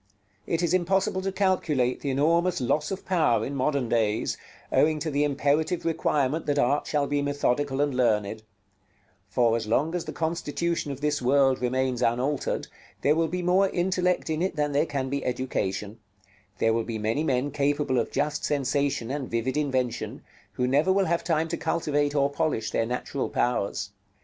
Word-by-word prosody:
It 165 +1 0
is 170 0 +1
impossible 185 +1 +1
to 195 +1 -2
calculate 165 -10 +1
the 140 - -2
enormous 170 +6 +2
loss 150 +4 0
of 195 0 -5
power 160 -10 +2
in 140 - -4
modern 140 -1 0
days, 110 -2 0 0.4
owing 155 0 +3
to 155 +1 -3
the 145 +1 +1
imperative 145 +4 0
requirement 155 -2 0
that 145 0 +1
art 140 +1 +2
shall 145 -2 +1
be 145 +1 0
methodical 145 -1 0
and 145 -1 +1
learned: 110 -3 +1 0.9
for 115 +2 +3
as 115 -2 -3
long 145 +9 +1
as 175 -2 -2
the - - -5
constitution 165 -1 -2
of 140 0 -7
this 150 -1 0
world 135 0 +3
remains 130 0 0
unaltered, 125 +4 0 0.4
there 145 - +5
will 165 +1 +1
be 180 +2 -3
more 185 +2 +3
intellect 180 -1 0
in 155 +1 -1
it 185 -1 -1
than 150 -1 0
there 145 +3 +2
can 135 -2 -2
be 140 +1 -2
education; 110 -4 -2 0.6
there 115 - +2
will 115 0 0
be 115 -1 -4
many 110 +7 0
men 135 -1 0
capable 145 -2 +1
of 115 - -1
just 150 0 -1
sensation 140 -3 0
and 140 -2 -3
vivid 115 +3 -1
invention, 130 -5 -2 0.3
who 125 - 0
never 145 +8 +3
will 195 0 +3
have 170 0 0
time 160 -1 +1
to 170 +1 -3
cultivate 145 -3 0
or 140 -1 +3
polish 140 -6 -1
their 115 - 0
natural 125 +2 -3
powers. 100 -4 -1
145 Hz, 180 wpm, -26 LUFS, 125-160 Hz, 0.9 s, there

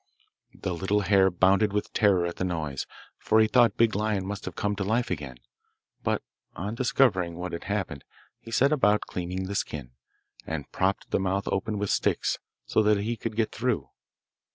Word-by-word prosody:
The 90 - -3
little 95 +4 0
hare 95 0 +4
bounded 95 +3 +3
with 105 - -2
terror 95 -5 +3
at 85 - -4
the - - -2
noise, 80 -7 -3 0.3
for 110 - +3
he 110 - +6
thought 120 0 +4
Big 115 -2 +4
Lion 105 -2 0
must 100 +1 -5
have 95 - -6
come 105 0 -1
to 100 - -1
life 115 +4 0
again; 75 -7 -4 0.7
but - - -1 0.3
on 100 +4 -4
discovering 115 -8 +2
what 90 +1 -5
had 85 - -6
happened 95 -8 -3 0.4
he - - -12
set 135 +5 +3
about 105 -8 +3
cleaning 90 +1 -4
the 95 +2 -4
skin, 70 -10 -3 0.6
and 80 -3 -4
propped 95 +1 -1
the - - +2
mouth 95 +1 -1
open 105 +2 -1
with 100 -1 -1
sticks - - +1 0.3
so - - +2
that 105 -1 +4
he 110 +4 -1
could 115 -1 -5
get 110 -1 +1
through. 115 - -1
100 Hz, 185 wpm, -27 LUFS, 90-110 Hz, 0.7 s, he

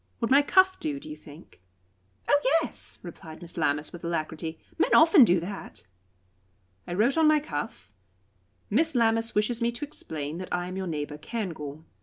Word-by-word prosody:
Would 230 - -1
my 280 +2 +7
cuff 375 +5 +4
do, 295 -3 -3
do 310 - -11
you 305 - -6
think?" 155 - -15 0.7
"Oh 290 0 +4 0.2
yes!" - - -5
replied 160 -1 -10
Miss 175 -1 -7
Lammas, 150 -2 0
with 175 - -10
alacrity; 160 -1 -3 0.2
"men - - +4
often 325 -2 +8
do 180 -5 +4
that." 195 - -8 1.0
I 175 - -3
wrote 240 - +2
on 320 -1 +5
my 305 0 +5
cuff: 145 - -6 0.8
"Miss 315 +7 +2
Lammas 225 -1 +2
wishes 225 +3 +1
me 235 0 +2
to 285 +5 -4
explain 155 - -5
that 185 - -7
I 175 0 -1
am 185 - -6
your 190 -1 -3
neighbour, 150 -2 -4
Cairngorm." 160 -8 -5
190 Hz, 175 wpm, -27 LUFS, -, 1.0 s, often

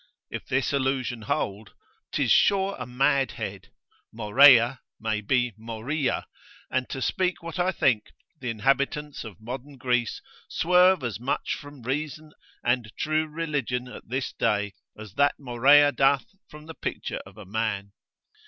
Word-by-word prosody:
If - - -6
this 135 +2 0
allusion 130 -3 -1
hold, 100 0 -3 0.4
'tis - - +1
sure 195 -1 +4
a - - -5
mad 130 0 +2
head; - - -6 0.4
Morea 130 +2 +6 0.2
may 110 -1 -1
be 125 +2 +1
Moria; 115 +6 -2 0.5
and 130 0 -1
to 135 -2 -3
speak 180 -2 0
what 170 +2 -6
I 180 +1 +2
think, 120 - +1 0.3
the 125 - -4
inhabitants 140 +6 0
of 110 -7 -10
modern 130 +5 -7
Greece 125 -2 0 0.3
swerve 180 -1 +4
as 120 -3 -3
much 130 +4 -1
from 145 -3 -10
reason 150 +4 -4 0.3
and 120 -3 0
true 155 +1 0
religion 145 -6 -2
at 125 - -11
this 130 +1 -2
day, 105 -1 0 0.2
as 105 -3 -10
that 145 0 +4
Morea 140 +3 +5
doth 135 -2 +3 0.2
from 150 0 -12
the 160 - -8
picture - - -4
of 95 +2 -16
a 105 - -10
man. 100 -1 -2
130 Hz, 145 wpm, -26 LUFS, 115-145 Hz, 0.5 s, Morea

